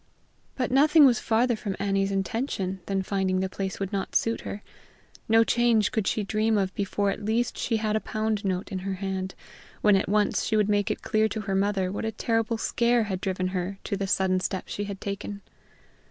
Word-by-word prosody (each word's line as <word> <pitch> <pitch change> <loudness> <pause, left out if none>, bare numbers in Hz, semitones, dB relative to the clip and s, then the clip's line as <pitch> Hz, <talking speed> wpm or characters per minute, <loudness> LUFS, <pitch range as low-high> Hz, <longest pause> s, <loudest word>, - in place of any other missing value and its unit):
But 250 -2 -1
nothing 295 +3 +6
was 245 -4 +4
farther 235 +2 +2
from 205 -3 -4
Annie's 195 -1 0
intention 195 -1 -2
than 195 -1 0
finding 190 -1 0
the 190 - 0
place 190 0 -4
would 195 +1 -3
not 195 -1 -3
suit 230 0 +1
her: 205 - -6 0.7
no 225 +1 +6
change 230 -3 +2
could 220 -3 -1
she 215 - 0
dream 215 +2 +1
of 190 -1 0
before 200 -1 0
at 210 - -6
least 225 +3 0
she 230 - 0
had 215 -1 -1
a - - +2
pound 215 -1 -2
note 185 0 -2
in 190 - -2
her 190 +1 -3
hand, 190 0 -4 0.5
when 210 -1 +5
at 190 - +1
once 210 0 +2
she 220 - +1
would 210 -1 +2
make 205 -1 +2
it - - -3
clear 215 0 +2
to 215 - -3
her 195 -1 -3
mother 195 -1 +1
what 200 - -4
a 220 - -1
terrible 225 0 0
scare 235 +1 +2
had 190 -3 -3
driven 185 -2 -1
her 185 +1 -3
to - - -2
the 195 0 -2
sudden 190 -1 +2
step 185 +1 -3
she 205 - -4
had 200 -1 -6
taken. 200 0 -5
205 Hz, 210 wpm, -26 LUFS, 190-220 Hz, 0.7 s, nothing